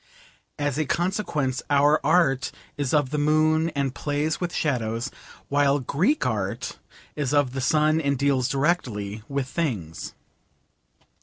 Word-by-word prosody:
As 145 -1 -1
a 155 - +1
consequence 165 -8 -1
our 145 +1 +4
art 150 -4 +3 0.2
is 145 -3 -2
of 145 -4 +2
the 150 - 0
moon 155 +2 +3
and 140 -2 0
plays 150 +3 -1
with 175 -1 -1
shadows, 115 -7 -1 0.4
while 140 0 +3
Greek 180 - +1
art - - -2 0.4
is 145 -1 -1
of 140 -3 +2
the 135 - -2
sun 155 +4 +3
and 140 -2 0
deals 135 -2 +1
directly 125 - -1
with 140 -2 -2
things. 110 - -3
145 Hz, 135 wpm, -25 LUFS, 130-155 Hz, 0.4 s, our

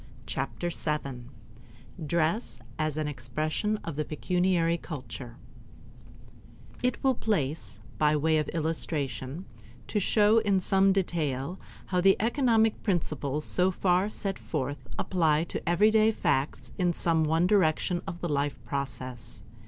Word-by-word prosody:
Chapter 175 0 -3
Seven 140 -7 -2 0.4
~~ 120 +8 -15
Dress 170 - 0 0.2
as 155 -1 -1
an 155 -1 -1
Expression 155 - -2
of 165 -4 -5
the 155 - +1
Pecuniary 170 +2 +1
Culture 125 -5 -8 1.5
It 250 -1 +1
will 265 -1 +4
in - - -11
place, 145 - -2 0.2
by 150 0 +4
way 155 +1 +2
of 150 - -2
illustration, 155 -1 -2 0.4
to 210 - 0
show 210 +3 +4
in 200 -3 +2
some 195 +1 +4
detail 170 -4 -1 0.3
how 180 -1 0
the 195 +1 +5
economic 225 -2 +2
principles 155 - -1
so 180 +1 +3
far 185 +1 +1
set 195 -2 -3
forth 140 -4 -4
apply 160 -4 +2
to 170 - -4
everyday 215 +5 +5
facts 135 - -1
in 175 -1 +2
some 165 -1 +1
one 160 +3 +2
direction 180 -2 +2
of 175 -2 -6
the 175 - -1
life 145 0 0
process. 125 -4 -5
165 Hz, 135 wpm, -28 LUFS, 145-190 Hz, 1.5 s, the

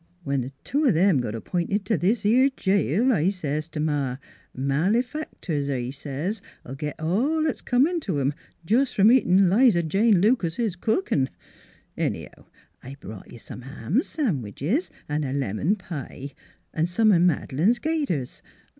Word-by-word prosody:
When 140 -3 0
th' 125 +2 -6
two 290 +3 0
of 240 - +4
'em 180 -4 +4
got 115 -3 -3
ap 110 - -7
p'inted 190 +3 0
t' 220 - +1
this 200 +6 0
'ere 255 +6 +5
jail 200 - +2
I 180 -3 +2
says 155 -5 -3
t' 155 - -6
Ma, 145 -4 -1 0.2
' - - -32
Malefactors,' 165 - -1
I 125 -2 -2
says, 150 +9 -4
' - - -32
'11 135 +2 -7
git 150 -1 -3
all 250 - +1
'at's 310 - -2
comin' 290 +8 +2
t' 190 - -2
'em 140 +1 +1 0.3
jes' 250 +5 +2
from 210 +3 +5
eatin' 195 -7 +4
'Liza 200 -2 +4
Jane 200 +5 +3
Lucases 205 -1 +1
cookinV 175 - 0 0.7
Anyhow, - - -4 0.3
I 135 +2 -9
brought 105 -7 -10
you - - -10
some 120 - -9
ham 135 - -1
sandwiches 190 - -2 0.2
an' 150 0 -1
a 135 -2 -3
lemon 140 - 0
pie 145 - -7 0.4
an' 160 +1 +1
some 215 +5 +3
o' 180 - +5
Mad'lane's 175 - +2
gaiters. 285 - -2
175 Hz, 165 wpm, -25 LUFS, 140-225 Hz, 0.7 s, ere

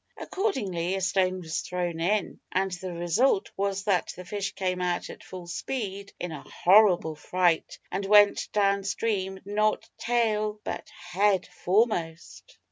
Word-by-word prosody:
Accordingly 195 - -1
a 195 - -2
stone 185 -1 +1
was 160 -2 -3
thrown 175 -2 -3
in, 195 +3 0
and 190 +1 0
the 180 +1 -5
result 175 +7 +1
was 195 0 -1
that 195 -4 +1
the 180 - -9
fish 195 +1 -3
came 185 -1 -1
out 180 -1 -1
at - - -12
full 185 -2 -9
speed 200 +1 -4
in 175 - -4
a 150 -3 -6
horrible 185 -4 +4
fright, 175 +1 0
and 190 +2 -2
went 205 0 +5
down 200 -1 +2
stream, 195 -1 -1
not 215 +1 0
tail 215 -3 0
but - - -5
head 185 +2 0
foremost. 175 -5 -1
190 Hz, 145 wpm, -27 LUFS, 180-205 Hz, -, went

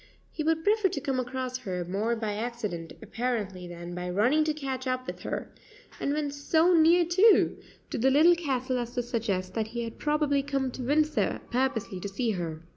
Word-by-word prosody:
He 310 - -3
would 320 +1 +1
prefer 420 +1 +3
to 365 - -3
come 265 -2 -1
across 255 0 -3
her 180 -5 -4
more 205 +6 -1
by 220 -2 -2
accident 210 -7 -4
apparently 215 -5 -3
than 175 0 -8
by 180 0 -4
running 240 +12 +3
to 310 - +1
catch 265 -3 -4
up 255 0 -1
with - - -6
her, - - -5 0.5
and 280 - -1
when 295 -1 -1
so 320 +5 +3
near, 335 +1 +5
too, 380 +6 +4 0.3
to - - -2
the 260 +4 +4
Little 310 +6 +6
Castle 260 -6 -1
as 240 0 -5
to 245 - 0
suggest 205 -6 -2
that 220 -1 -1
he 235 +1 -4
had 230 -1 -7
probably 295 -2 +1
come 275 -2 -1
to 255 - -7
Windsor 300 +4 +1
purposely 240 -6 -1
to 200 - -5
see 225 +4 -1
her. 165 -4 -4
255 Hz, 195 wpm, -28 LUFS, 210-295 Hz, 0.5 s, Little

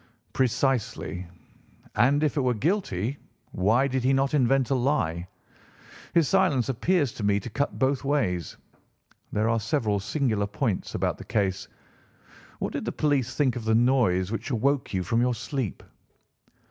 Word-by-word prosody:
"Precisely. 125 -8 0 0.7
And 135 +7 +3
if 150 - +1
it 145 - +1
were 125 -2 +1
guilty, 140 - -1 0.3
why 110 +9 +2
did 130 -2 -1
he 130 +2 +3
not 135 +2 +1
invent 135 -1 +2
a - - +5
lie? 120 - 0 0.9
His 165 -4 +4
silence 175 -10 +2
appears 145 +2 +1
to 110 - -7
me 100 0 +2
to 120 +2 -8
cut 140 +4 -2
both 135 +1 +1
ways. 105 - -1 0.7
There 105 +1 +1
are 115 0 +2
several 110 -2 0
singular 110 -2 0
points 105 -2 -2
about - - -1
the - - -7
case. 95 -3 -1 0.9
What - - -3
did - - -3
the - - -1
police 135 -4 0
think 135 -4 +2
of 120 - -4
the 110 0 +3
noise 115 -7 +2
which 115 - -4
awoke 135 +3 0
you 95 -2 -1
from 115 +7 +1
your 125 0 +1
sleep?" 130 -2 -4
125 Hz, 160 wpm, -26 LUFS, 105-140 Hz, 0.9 s, a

